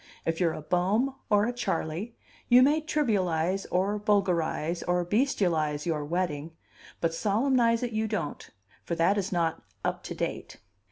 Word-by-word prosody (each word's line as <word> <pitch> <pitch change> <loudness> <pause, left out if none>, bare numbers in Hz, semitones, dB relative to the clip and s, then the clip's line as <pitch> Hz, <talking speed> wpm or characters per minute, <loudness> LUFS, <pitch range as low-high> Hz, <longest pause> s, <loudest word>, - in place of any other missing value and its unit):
If 165 0 -1
you're 170 -3 +2
a 155 - -7
Bohm 195 - +1 0.2
or 205 0 +4
a 240 - -1
Charley, 200 -1 -3 0.3
you 245 +1 +8
may 300 +4 +3
trivialize 195 - 0
or 195 +3 +1
vulgarize 180 -5 +1
or 175 0 0
bestialize 170 - +1
your 155 -3 -1
wedding, 160 -1 -2 0.5
but 165 -1 0
solemnize 230 +5 +2
it 240 - -2
you 220 0 -1
don't, 205 -9 -4 0.3
for 170 - -3
that 190 +5 +3
is 195 0 -3
not 170 -3 0 0.2
"up - - -1
to - - -5
date." - - -4
185 Hz, 155 wpm, -28 LUFS, 165-220 Hz, 0.5 s, you